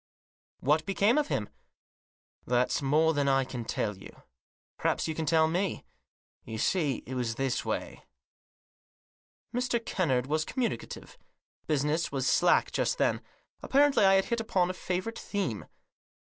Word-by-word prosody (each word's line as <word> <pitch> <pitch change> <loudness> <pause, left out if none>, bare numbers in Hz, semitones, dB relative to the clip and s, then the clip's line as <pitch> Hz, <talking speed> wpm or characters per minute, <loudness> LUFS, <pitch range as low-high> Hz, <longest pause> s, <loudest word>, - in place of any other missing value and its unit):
" - - -75
But - - -10
what 150 +2 +3
became 205 +7 +3
of 295 - 0
him? 105 - -1 0.3
" - - -86
" - - -45
That's 125 +3 +1
more 155 +4 +3
than 145 -2 0
I 135 -1 +3
can 125 -2 -6
tell 105 -2 -2
you. - - -14 0.6
Perhaps - - 0
you 160 - -2
can 160 0 -4
tell 160 0 +4
me. 180 +4 -2 0.6
You 110 -1 -6
see, 145 - 0
it 130 - -7
was 120 -3 -2
this 135 -1 -1
way." - - -4 1.5
Mr. 245 -1 0
Kennard 130 -10 0
was 155 +3 0
communicative. 245 +7 -4 0.5
Business 150 +2 0
was 135 -2 -2
slack 175 +6 +3
just - - 0
then. - - +1 0.4
Apparently 280 -4 +3
I 195 0 +6
had 195 - +3
hit 235 -1 -1
upon 185 -5 +1
a - - -7
favourite 185 +5 -3
theme. 180 - -3
160 Hz, 155 wpm, -29 LUFS, 135-195 Hz, 1.5 s, I